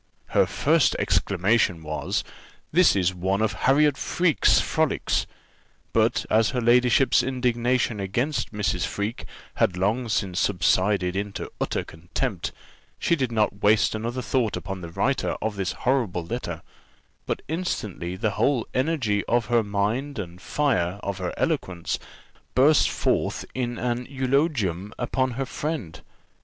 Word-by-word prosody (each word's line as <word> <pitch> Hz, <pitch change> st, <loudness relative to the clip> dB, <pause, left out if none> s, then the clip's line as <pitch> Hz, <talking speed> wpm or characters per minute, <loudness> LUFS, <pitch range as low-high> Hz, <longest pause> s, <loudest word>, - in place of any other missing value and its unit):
Her -, -, +3 dB
first -, -, +2 dB
exclamation 95 Hz, -3 st, +1 dB
was, 75 Hz, 0 st, -2 dB, 0.5 s
"This 180 Hz, -, +5 dB
is 95 Hz, -2 st, +2 dB
one 95 Hz, +2 st, -1 dB
of 110 Hz, -1 st, +1 dB
Harriot 145 Hz, +1 st, +3 dB
Freke's 175 Hz, -5 st, +3 dB
frolics;" -, -, 0 dB, 0.7 s
but -, -, +2 dB
as 110 Hz, +1 st, +3 dB
her 125 Hz, -, -1 dB
ladyship's 125 Hz, +2 st, +4 dB
indignation 125 Hz, -3 st, 0 dB
against 120 Hz, +10 st, -1 dB
Mrs. 105 Hz, -2 st, -1 dB
Freke 105 Hz, +4 st, -4 dB, 0.3 s
had 90 Hz, -, +2 dB
long 110 Hz, +6 st, 0 dB
since 95 Hz, -3 st, 0 dB
subsided 95 Hz, 0 st, +2 dB
into 100 Hz, 0 st, -4 dB
utter -, -, -1 dB
contempt, 80 Hz, +2 st, -4 dB, 0.5 s
she 170 Hz, -, +2 dB
did 130 Hz, -6 st, -1 dB
not 105 Hz, -3 st, 0 dB
waste 105 Hz, +1 st, +4 dB
another 120 Hz, +4 st, -3 dB
thought 120 Hz, -6 st, 0 dB
upon 95 Hz, +2 st, -6 dB
the 85 Hz, -, -7 dB
writer 130 Hz, +10 st, 0 dB
of 110 Hz, -1 st, -2 dB
this 95 Hz, -2 st, -2 dB
horrible 115 Hz, -10 st, +1 dB
letter; 120 Hz, +8 st, -5 dB, 0.6 s
but -, -, -2 dB
instantly 110 Hz, -, -3 dB
the 110 Hz, +2 st, -1 dB
whole 115 Hz, +5 st, +1 dB
energy 130 Hz, -7 st, 0 dB
of 120 Hz, -1 st, +1 dB
her 120 Hz, -, +5 dB
mind 110 Hz, +8 st, -1 dB
and 90 Hz, -3 st, -6 dB
fire 100 Hz, -11 st, 0 dB
of 100 Hz, -1 st, -3 dB
her 90 Hz, -1 st, -2 dB
eloquence 90 Hz, -2 st, -1 dB, 0.6 s
burst 145 Hz, +4 st, +5 dB
forth -, -, 0 dB
in 120 Hz, -2 st, -2 dB
an 125 Hz, 0 st, -2 dB
eulogium 130 Hz, -, 0 dB
upon 130 Hz, -1 st, -1 dB
her 135 Hz, +3 st, -2 dB
friend. 145 Hz, -, -4 dB
110 Hz, 135 wpm, -25 LUFS, 95-130 Hz, 0.7 s, This